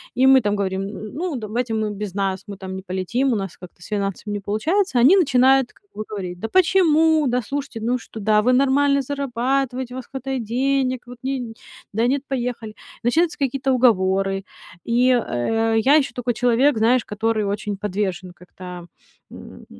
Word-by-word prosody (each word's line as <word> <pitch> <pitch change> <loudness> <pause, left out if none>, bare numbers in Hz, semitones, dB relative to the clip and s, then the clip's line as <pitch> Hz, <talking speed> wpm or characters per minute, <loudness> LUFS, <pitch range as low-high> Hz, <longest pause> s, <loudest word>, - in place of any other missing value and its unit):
И 260 +1 +4
мы 265 -1 +7
там 205 0 0
говорим: 190 -1 -2
"М, 210 +1 -7
ну, 335 -1 -3
давайте 230 +1 -3
вы 215 -1 -1
без 205 -2 -6
нас, 195 -1 -2
мы 200 - -7
там 190 0 -7
не 190 - -7
полетим, 195 +8 -1
у - - +1
нас 195 -3 -4
как-то 175 -1 -14
с - - -11
финансами 205 0 -3
не 205 - -2
получается". 260 - 0
Они 275 +11 +7
начинают 265 -4 +3
как 405 - -29
бы 215 - -4
говорить: 180 -4 -6
"Да 225 - -3
почему, 320 -3 +4
да, 250 0 +1
слушайте, 275 -2 -5
ну 245 +3 0
что 230 - -10
да, 210 0 +3
вы 250 +1 +3
нормально 280 +1 +3
зарабатываете, 260 -1 -2
у - - -5
вас 255 - -7
хватает 265 -2 -4
денег, 255 +2 0
вот 245 0 -10
не, 255 -4 -3 0.4
да 225 +3 +1
нет, 275 +2 +1
поехали". 240 -4 -4 0.3
Начинаются 320 +8 +1
какие-то 270 -1 0
уговоры, 195 -5 +2 0.4
и, 245 +2 +3
э, 225 - 0
я 280 +5 +5
ещё 300 -3 +2
такой 245 -1 -2
человек, 245 +3 +3
знаешь, 235 +2 +3
который 220 +1 -1
очень 205 +1 -3
подвержен 190 -2 -3
как-то, 180 0 -10 0.5
м, - - -12
235 Hz, 180 wpm, -21 LUFS, 205-265 Hz, 0.5 s, мы